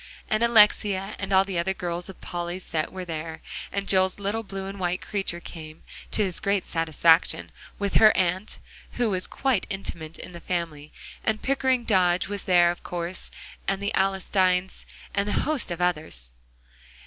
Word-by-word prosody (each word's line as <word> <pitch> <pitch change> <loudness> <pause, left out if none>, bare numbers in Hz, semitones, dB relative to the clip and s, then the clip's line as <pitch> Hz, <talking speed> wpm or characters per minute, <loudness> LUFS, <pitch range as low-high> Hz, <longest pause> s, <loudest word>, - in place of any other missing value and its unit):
And 215 +1 +2
Alexia 210 -3 +4
and 200 0 -4
all 190 0 +5
the 190 -3 -2
other 190 +3 0
girls 175 0 -3
of 190 - -10
Polly's 175 +1 -4
set 155 -1 -2
were 185 -1 -6
there, 160 -1 -5 0.3
and 200 0 -2
Joel's 190 -1 +3
little 205 +2 -1
blue 195 -2 -6
and 195 0 -7
white 180 0 0
creature 195 -4 -3
came, 160 -2 -10 0.3
to 215 - +1
his 185 -4 -2
great 200 -2 0
satisfaction, 165 +1 +3 0.3
with 200 -1 -2
her 215 -1 +8
aunt, 185 +3 0 0.4
who 240 -3 +1
was 185 -1 -1
quite 265 -8 0
intimate 165 -5 -4
in - - -9
the 170 -1 -10
family; 160 -4 -3 0.3
and 220 -1 0
Pickering 260 -2 +2
Dodge 185 -5 +3
was 205 0 -5
there 175 -2 +5
of 175 - -8
course, 175 +1 -3 0.4
and 195 0 +1
the 200 +1 -2
Alstynes, 190 -1 +1 0.3
and 200 +1 0
hosts 300 -4 +1
of 175 0 -4
others. 155 - -1
185 Hz, 170 wpm, -26 LUFS, 175-200 Hz, 0.4 s, her